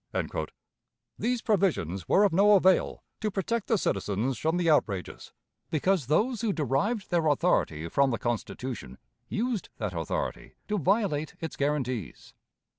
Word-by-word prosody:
These 245 0 0
provisions 150 - 0
were 200 - +5
of 200 -5 +3
no 205 +4 +6
avail 190 -1 +3 0.2
to 215 - -1
protect 205 +3 -2
the 225 - +3
citizens 105 - -1
from 160 +2 +1
the 175 -1 0
outrages, 105 - 0 0.4
because 165 -2 +1
those 220 - +1
who 225 -3 +1
derived 170 - -1
their 170 -2 +2
authority 85 - +1
from 140 +10 +2
the 115 - -1
Constitution 120 - -4 0.3
used 230 -2 -2
that - - -3
authority - - -4
to 210 -1 0
violate 180 -4 0
its 165 - -5
guarantees. 130 - -2
165 Hz, 135 wpm, -28 LUFS, 130-205 Hz, 0.4 s, no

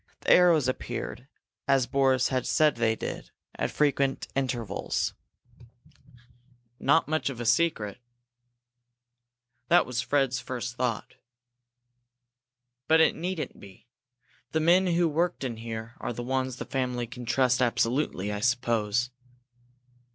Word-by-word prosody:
The - - +1
arrows 170 -6 +6
appeared, 125 0 -4 0.4
as 135 -2 +3
Boris 130 -1 +2
had 130 -2 -1
said 155 -1 +3
they 115 -1 +2
did, - - -6 0.2
at - - -2
frequent 140 -2 0
intervals. 125 -5 -2 1.7
"Not 145 +4 +3
much 155 -1 0
of 130 -4 -7
a 120 - -4
secret." 120 -5 +1 1.7
That 175 +1 +5
was 125 -1 -2
Fred's 135 -2 +1
first 120 -1 -5
thought. 120 -4 -3 1.7
"But 160 +1 +5
it 160 - +5
needn't 180 -2 -4
be. 100 -2 -15 0.7
The 160 - +2
men 175 +4 +4
who 170 0 +2
worked 170 +1 -1
in 120 -4 -3
here 115 0 -6
are - - -3
the 120 - -5
ones 130 0 -1
the - - -6
family 125 -2 -2
can 125 +1 -9
trust 125 0 +2
absolutely, 115 -4 0
I 105 - -3
suppose." 120 -1 0
130 Hz, 125 wpm, -27 LUFS, 120-145 Hz, 1.7 s, arrows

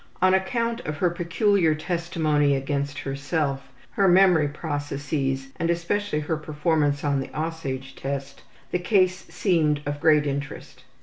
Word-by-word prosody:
On 185 0 +4
account 230 +5 0
of 150 -9 -5
her 175 +1 +2
peculiar 175 0 +2
testimony 155 -3 +1
against 140 +1 -2
herself, 140 -1 -2 0.2
her 195 - +2
memory 180 -4 +5
processes 145 -2 -3
and 170 - -1
especially 170 0 -1
her 155 +1 -2
performance 150 -1 0
on 140 -2 +1
the 135 - -4
``Aussage'' 140 -5 -4
test 140 0 -5 0.3
the 180 - 0
case 185 0 +2
seemed 155 -6 +1
of 145 0 -4
great 150 -2 +4
interest. 140 0 -5
155 Hz, 135 wpm, -25 LUFS, 145-175 Hz, 0.3 s, memory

